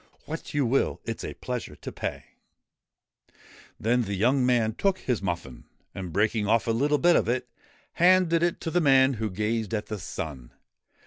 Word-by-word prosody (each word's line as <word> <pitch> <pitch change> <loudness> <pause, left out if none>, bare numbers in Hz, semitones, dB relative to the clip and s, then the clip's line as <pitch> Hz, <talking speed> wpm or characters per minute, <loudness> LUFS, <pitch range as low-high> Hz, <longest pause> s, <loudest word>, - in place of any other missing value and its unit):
' - - -34
What 160 +2 -6
you 145 -2 +2
will: 130 +4 +1
it 115 - -4
's - - -8
a - - -5
pleasure 125 -2 -5
to - - -8
pay' - - -5 1.5
Then 120 +3 +2
the 100 -3 -3
young 125 +7 +2
man 120 -3 +2
took 195 - +1
his 125 - -2
muffin, 85 -9 -4 0.3
and, 90 -3 -6
breaking 105 +3 +1
off 115 +1 +3
a 115 - +1
little 145 +6 +2
bit 175 +3 +4
of - - +2
it, 125 +1 -1 0.5
handed 175 -1 +4
it 175 0 +1
to 165 - -3
the 175 - +2
man 135 -2 +5
who 110 - 0
gazed 110 +2 -2
at 105 - -3
the 105 -2 -5
sun. 70 -8 -6
115 Hz, 190 wpm, -26 LUFS, 105-140 Hz, 1.5 s, man